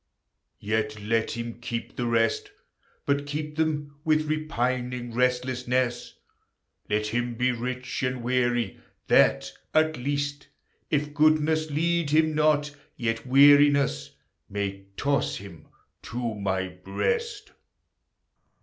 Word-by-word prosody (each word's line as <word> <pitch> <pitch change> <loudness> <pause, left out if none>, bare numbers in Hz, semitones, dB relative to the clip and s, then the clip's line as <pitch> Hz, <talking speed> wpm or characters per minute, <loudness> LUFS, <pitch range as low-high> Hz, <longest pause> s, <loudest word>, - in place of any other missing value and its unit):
Yet 110 0 -1
let 115 +2 0
him 115 0 -5
keep 115 -1 -5
the 120 - -2
rest, 115 -1 +1 0.6
But 140 0 0
keep 150 +1 -4
them 150 -2 -2
with 155 -1 +2
repining 125 -5 -2
restlessness: 125 0 0 0.7
Let 105 +1 +1
him 120 +2 -2
be 125 +2 +2
rich 125 +1 -4
and 130 -2 -2
weary, 120 -3 0 0.3
that, - - +4 0.2
at 155 0 +3
least, 145 +2 -2 0.4
If 150 0 0
goodness 155 0 +3
lead 165 +1 0
him 155 +1 +3
not, 150 -1 +2 0.2
yet 115 0 -2
weariness 140 - +5 0.4
May 100 -1 -4
toss 140 -2 0
him 90 -6 -10 0.3
to 120 -1 -4
my 95 -2 -2
breast. 415 - -3
125 Hz, 110 wpm, -26 LUFS, 115-150 Hz, 0.7 s, weariness